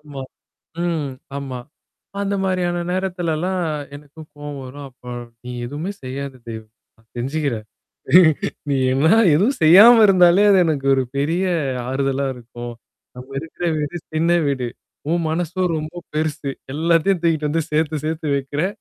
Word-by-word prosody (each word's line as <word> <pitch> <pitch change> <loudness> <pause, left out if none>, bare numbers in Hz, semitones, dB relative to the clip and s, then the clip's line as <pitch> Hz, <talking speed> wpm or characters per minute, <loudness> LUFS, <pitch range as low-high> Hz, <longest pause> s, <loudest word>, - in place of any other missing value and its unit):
ஆமா. 145 -3 -8 0.6
ம். 160 -5 -1 0.3
ஆமா. 130 -3 -5 0.6
அந்த 200 0 -1
மாரியான 180 -2 0
நேரத்துலல்லாம், 180 -1 -1 0.3
எனக்கும் 150 +2 -14
கோவம் 145 -1 -7
வரும். 140 +2 -9
அப்ப 125 -1 -21 0.4
நீ 125 - -6 0.2
எதுவுமே 150 +9 -4
செய்யாத 135 +1 -5
தெய்வமே! 110 -1 -8 0.3
நான் 110 0 -29
செஞ்சுக்கிறன். 130 -4 -2 1.0
நீ 140 - +2 0.2
என்ன 140 +4 +2 0.3
எதுவும் 210 - +2
செய்யாம 210 +9 +9
இருந்தாலே 185 0 +5
அது 195 - +6
எனக்கு 145 -4 -1
ஒரு 135 - +2
பெரிய 165 +7 0 0.4
ஆறுதலா 135 +1 0
இருக்கும். 120 0 -9 0.4
நம்ம 125 +2 -10
இருக்கிற 165 +2 -5
வீடு, 150 +3 -3 0.2
சின்ன 165 +2 +2
வீடு. 130 -4 -1 0.4
உன் 170 0 +1
மனசோ 175 +3 -2
ரொம்போ 155 +3 -5 0.2
பெருசு. 155 -2 -2 0.2
எல்லாத்தையும் 170 +3 +2
தூக்கிட்டு 160 -3 +1
வந்து 160 +2 0
சேத்து 155 0 0
சேத்து 155 0 -2
வைக்கிறே! 145 +4 -1
155 Hz, 135 wpm, -21 LUFS, 140-175 Hz, 1.0 s, செய்யாம